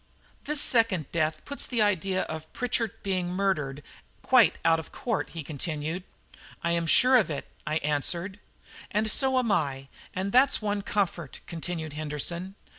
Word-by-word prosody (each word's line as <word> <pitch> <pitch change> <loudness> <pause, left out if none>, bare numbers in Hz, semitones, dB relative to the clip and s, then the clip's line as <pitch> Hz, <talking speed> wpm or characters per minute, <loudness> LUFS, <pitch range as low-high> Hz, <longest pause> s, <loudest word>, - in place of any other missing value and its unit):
"This 300 0 0
second 225 - +3
death 155 -2 -1
puts 280 - -2
the 245 - -1
idea 190 -2 +1
of 160 0 -7
Pritchard 235 -3 -1
being 185 -3 -1
murdered 155 -7 -1 0.4
quite 255 -4 +5
out 165 0 +5
of 160 - -9
court," 235 -3 -2
he 165 -2 -6
continued. 155 +3 -4 0.6
"I 170 - +1
am 170 -1 0
sure 255 +9 +7
of 220 - +2
it," 145 - -4 0.2
I 155 - 0
answered. 170 +7 -1 0.5
"And 215 +1 +1
so 265 -1 +3
am 245 -4 +2
I, 140 -7 -1 0.3
and 190 +2 -2
that's 260 +4 +5
one 205 -1 -1
comfort," 180 -7 -2
continued 165 -2 -5
Henderson. 155 +5 -3
180 Hz, 155 wpm, -27 LUFS, 155-210 Hz, 0.6 s, sure